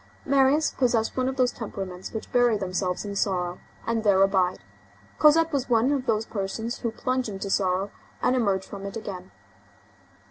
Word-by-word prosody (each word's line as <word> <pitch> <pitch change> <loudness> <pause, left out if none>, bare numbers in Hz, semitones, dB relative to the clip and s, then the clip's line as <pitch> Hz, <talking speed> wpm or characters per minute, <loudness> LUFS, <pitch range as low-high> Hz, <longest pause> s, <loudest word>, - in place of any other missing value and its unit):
Marius 280 +3 +3
possessed 235 -4 +1
one 255 0 +1
of 265 - -4
those 255 -2 +2
temperaments 190 -5 -6
which 220 - -6
bury 245 -3 +4
themselves 185 -1 -2
in 200 -1 -5
sorrow 180 -3 -1 0.3
and 230 -1 0
there 195 -2 +5
abide; 190 -2 +2 0.6
Cosette 325 +2 +5
was 270 -2 -1
one 240 +3 +3
of 270 -2 -1
those 220 -1 +1
persons 220 +4 -4
who 235 - -1
plunge 255 +2 -2
into 195 0 -5
sorrow 190 +1 +1 0.3
and 255 - +2
emerge 200 -6 +1
from 200 -1 -8
it 200 - -6
again. 190 -4 -7
220 Hz, 170 wpm, -26 LUFS, 195-255 Hz, 0.6 s, there